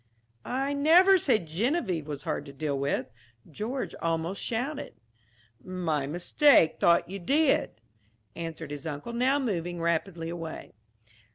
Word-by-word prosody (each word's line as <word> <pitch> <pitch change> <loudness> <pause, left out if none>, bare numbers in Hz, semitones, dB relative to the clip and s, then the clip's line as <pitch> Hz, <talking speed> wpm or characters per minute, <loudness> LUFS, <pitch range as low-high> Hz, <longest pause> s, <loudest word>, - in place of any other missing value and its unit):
"I 270 +3 -1
never 350 +7 +6
said 225 - +2
Geneviève 185 - -1
was 145 -1 -6
hard 145 - -3
to 140 - -10
deal 145 +1 -2
with," 135 -1 -2 0.4
George 225 - -4
almost 165 +3 -1
shouted. 260 +6 -3 0.7
"My 165 -6 -2
mistake 175 - +4
thought 170 - +4
you 195 +3 -6
did," 275 - +1 0.6
answered 165 -2 -6
his 145 +1 -6
uncle, 150 +10 -5
now 255 +4 +2
moving 175 - -2
rapidly 170 0 -1
away. 165 -2 -7
175 Hz, 125 wpm, -28 LUFS, 160-260 Hz, 0.7 s, never